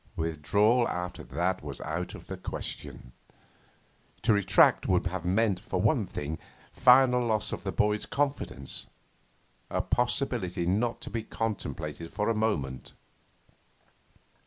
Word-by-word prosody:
Withdrawal 100 - +2
after 90 0 -4
that 90 +2 -1
was 70 -2 -7
out 85 +3 -4
of - - -11
the - - -5
question. 60 - -5 1.1
To 110 +1 +4
retract 100 -2 +4
would 90 -1 +2
have 90 -1 -3
meant, 100 +1 +2
for - - -3
one - - +2
thing, 75 +2 -4 0.3
final 125 -1 +6
loss 110 -2 0
of - - -5
the 95 - -2
boy's 105 +2 +1
confidence 140 - -3 0.8
a - - -1
possibility 120 -8 0
not 110 +7 0
to - - -7
be 115 - -2
contemplated 85 -8 -4
for 105 +2 -1
a 115 - +1
moment. 75 - -2
100 Hz, 130 wpm, -29 LUFS, 85-115 Hz, 1.1 s, final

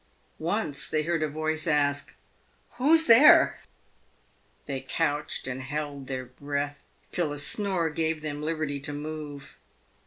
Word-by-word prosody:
Once 165 -3 -2
they 155 0 0
heard 165 0 -1
a 155 - +1
voice 155 +2 -2
ask 145 -2 +1 0.3
" - - -38
who's 320 +5 +4
there 245 +4 +7 0.5
?" - - -37
They 135 -2 -4
couched 145 +2 -1
and 130 +1 -4
held 140 0 -5
their 130 -1 -4
breath 145 +3 -4 0.3
till 170 -4 0
a 145 - -5
snore 175 +1 +2
gave 160 0 -1
them 150 -1 -4
liberty 155 -2 -2
to 145 +2 -6
move. 145 -1 -7
150 Hz, 145 wpm, -27 LUFS, 145-160 Hz, 0.5 s, there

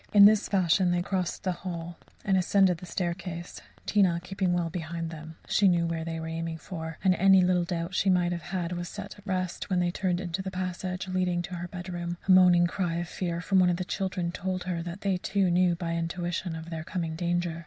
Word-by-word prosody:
In 200 -1 +9
this 210 0 +5
fashion 185 -1 +3
they 175 0 +1
crossed 185 -2 -2
the 185 - +1
hall 175 -1 -6 0.3
and 195 - +3
ascended 185 -1 +3
the 180 - -10
staircase, 175 0 -4 0.2
Tina 185 -5 +3
keeping 190 0 -1
well 175 -2 0
behind 165 -1 -4
them. 160 0 -9
She 205 - +4
knew 170 -2 +3
where 165 -1 -2
they 165 0 -4
were 160 - -5
aiming 165 0 -3
for, 160 -1 -7
and 190 -2 +5
any 190 +1 +6
little 180 -1 +2
doubt 170 -1 -2
that 185 - -8
she 195 - +2
might 180 -1 +3
have 170 -1 -3
had 175 -2 -2
was 175 -1 -4
set 205 0 -8
at 205 - -17
rest, 185 -2 -2
when 185 -2 +2
they 175 0 +1
turned 180 -1 -1
into 180 0 -3
the 190 - -4
passage 185 0 -4
leading 180 -1 0
to 185 - -7
her 175 0 -4
bedroom. 175 -1 -5
A - - +5
moaning 180 -2 +7
cry 175 -1 -1
of 170 0 -3
fear 170 -2 -3
from 190 +1 +3
one 180 -1 +5
of 175 - +1
the 185 - -3
children 185 -3 -2
told 185 0 -3
her 175 -2 -2
that 175 +3 -6
they, 195 -2 +1
too, 190 0 +1
knew 175 0 +3
by 170 -1 -3
intuition 170 +1 -2
of 160 +1 -8
their 160 -1 -4
coming 165 -1 -3
danger. 175 -1 -1
175 Hz, 230 wpm, -28 LUFS, 170-185 Hz, 0.3 s, In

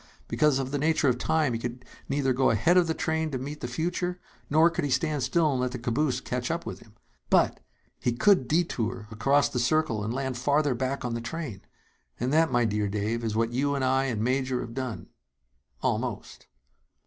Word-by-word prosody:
Because 150 -3 +2
of 135 -1 -3
the 145 - -1
nature 155 -1 +2
of 125 -1 0
time, 155 -4 +1
he 115 - -2
could 120 +1 -6 0.2
neither 135 -2 +1
go 130 +1 +3
ahead 140 - +3
of 180 -2 +5
the 160 - 0
train 160 0 -1
to 135 - -3
meet 145 +4 -6
the - - -3
future 175 +7 -2 0.3
nor 160 +3 +5
could - - -2
he 145 - -1
stand 145 +3 0
still 160 +3 +2
and 130 -2 0
let 125 -1 -1
the - - -3
caboose 125 +2 0
catch 125 -1 -3
up 170 +1 -2
with - - -6
him. 110 -1 -19 0.3
But - - +3 0.4
he 125 - 0
could 155 - +4
detour 120 -9 -1
across 140 +6 +3
the 125 - -3
circle 125 -4 +1
and 110 - -2
land 130 -1 -3
farther 145 +2 +2
back 130 +2 -2
on 120 - -2
the 115 - -3
train! 120 - -5 0.6
And 125 +4 -1
that, 160 -2 +4
my 120 -1 +3
dear 105 -1 0
Dave, 105 +3 -2
is 110 -2 -2
what 115 +1 0
you 140 +3 +1
and 135 -1 0
I 130 +1 +2
and 115 -5 -1
Major 130 0 0
have 115 -2 -7
done 130 -3 -5 0.7
almost." - - -3
130 Hz, 210 wpm, -27 LUFS, 120-150 Hz, 0.7 s, of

